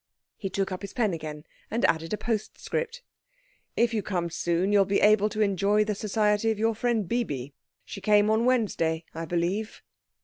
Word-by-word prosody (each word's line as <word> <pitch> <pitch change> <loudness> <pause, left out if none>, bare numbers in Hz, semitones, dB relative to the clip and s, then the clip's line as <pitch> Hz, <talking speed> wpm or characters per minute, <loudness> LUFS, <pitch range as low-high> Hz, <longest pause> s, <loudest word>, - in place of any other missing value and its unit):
He 195 - -5
took 195 0 -2
up 185 - -4
his 200 - -7
pen 220 -7 +1
again 155 -2 -6 0.3
and 230 - +1
added 165 0 +1
a 210 - 0
postscript. 455 - -3 0.7
"If 235 0 +3
you 215 - 0
come 175 -4 -2
soon 175 +3 0
you 205 - +6
will 195 - +5
be 200 +1 +1
able 210 0 +4
to 215 0 -3
enjoy 200 +1 +3
the 210 - -1
society 210 +1 +1
of 220 - 0
your 225 +1 +1
friend 225 -3 0
Bibi. 145 - -2 0.3
She 195 - -8
came 210 0 +4
on 220 +2 +2
Wednesday, 170 -10 +1
I 165 +1 -4
believe." 175 +6 -2
205 Hz, 190 wpm, -27 LUFS, 175-220 Hz, 0.7 s, you